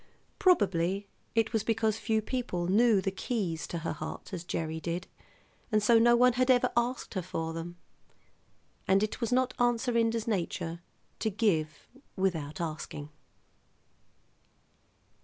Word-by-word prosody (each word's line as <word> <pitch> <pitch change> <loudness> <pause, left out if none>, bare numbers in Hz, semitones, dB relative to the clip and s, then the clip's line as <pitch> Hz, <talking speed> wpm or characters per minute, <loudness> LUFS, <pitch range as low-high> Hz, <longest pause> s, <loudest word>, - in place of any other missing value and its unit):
Probably 195 - +2 0.3
it 225 0 +2
was 220 -2 +1
because 220 -1 +1
few 220 -1 0
people 230 -9 -2
knew 210 +2 +4
the 195 - -1
keys 190 -5 -2
to 170 - -4
her - - -1
heart - - -7
as 175 -2 -4
Gerry 160 -2 -3
did, 170 +2 -3 0.7
and 215 -1 +3
so 230 +1 +6
no 240 +1 +6
one 250 +1 +5
had 255 +1 +1
ever 250 -1 +4
asked 240 +2 -1
her 190 - -1
for 165 -2 -4
them. 170 +1 -6 1.1
And 195 +2 +4
it 215 - -3
was 230 - -1
not 255 +1 +2
Aunt 240 -1 +3
Serinda's 230 -2 0
nature 170 -4 -2 0.4
to 220 - 0
give 175 -8 0 0.3
without 175 -4 -1
asking. 155 -2 -5
205 Hz, 140 wpm, -30 LUFS, 170-235 Hz, 1.1 s, so